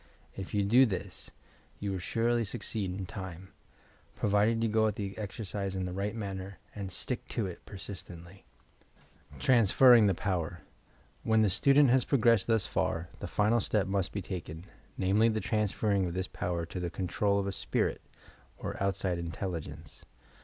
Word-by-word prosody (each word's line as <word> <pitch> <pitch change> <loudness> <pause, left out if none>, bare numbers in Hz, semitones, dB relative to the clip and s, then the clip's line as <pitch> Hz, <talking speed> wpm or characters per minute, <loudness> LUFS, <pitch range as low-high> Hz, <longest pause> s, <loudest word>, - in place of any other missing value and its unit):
If 95 +1 -6
you 100 - +3
do 125 +6 +6
this, 95 -3 -5 0.5
you 100 -1 -2
will 95 - -2
surely 115 +5 +1
succeed 105 -2 -4
in 95 +1 -4
time, 95 -1 -8 0.3
— - - -31
provided 105 +3 +2
you - - +3
go 110 0 +3
at 105 - -1
the 100 -2 -4
exercise 100 -2 -4
in 95 -1 -2
the 90 - -4
right 100 +3 -2
manner, 100 -3 -5 0.2
and 100 -2 -5
"stick 125 +6 -4
to 115 - -2
it" 90 -2 -7
persistently. 95 -2 -9 0.9
TBANSPERHINO 120 -1 +6
THE 95 - +2
POWER 85 -4 -2 0.6
When 110 -1 +3
the 105 - +3
student 140 +7 +5
has 130 -1 +4
progressed 115 -6 +3
thus 115 -3 +2
far, 85 +2 -1
the - - -5
final 110 +3 +2
step 105 -1 +1
must 95 -1 -1
be 100 - -4
taken, 85 -2 -6 0.3
namely 100 +5 +3
the 110 -1 0
transferring 105 -3 0
of 85 - -5
this 95 0 -2
power 85 -2 -3
to 90 - -6
the 90 -1 -2
control 100 +3 0
of 100 - 0
a 100 - -1
"spirit" - - -1 0.6
or - - -5
outside 95 -2 0
intelligence. 85 0 -6
100 Hz, 165 wpm, -30 LUFS, 95-110 Hz, 0.9 s, do